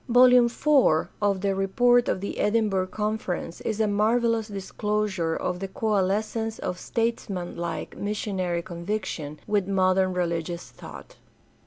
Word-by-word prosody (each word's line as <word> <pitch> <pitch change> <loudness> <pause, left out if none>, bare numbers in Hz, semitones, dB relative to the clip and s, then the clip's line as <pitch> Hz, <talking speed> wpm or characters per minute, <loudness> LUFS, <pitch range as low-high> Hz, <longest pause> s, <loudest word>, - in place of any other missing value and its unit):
Vol. 250 +1 +7
IV 245 - +4
of 200 -2 +1
the 200 0 +1
Report 240 +6 +3
of 185 - -1
the 200 - -4
Edinburgh 205 -3 +1
Conference 210 -4 -3
is 220 -1 -2
a 220 - +3
marvelous 225 +2 +2
disclosure 200 -3 -2
of 180 0 -2
the 195 - -3
coalescence 215 +2 -1
of 180 - -4
statesmanlike 185 -8 -3
missionary 190 -4 -2
conviction 170 -4 -4
with 205 -3 0
modern 185 -1 +2
religious 170 -1 -2
thought. - - -12
200 Hz, 125 wpm, -26 LUFS, 185-220 Hz, -, Vol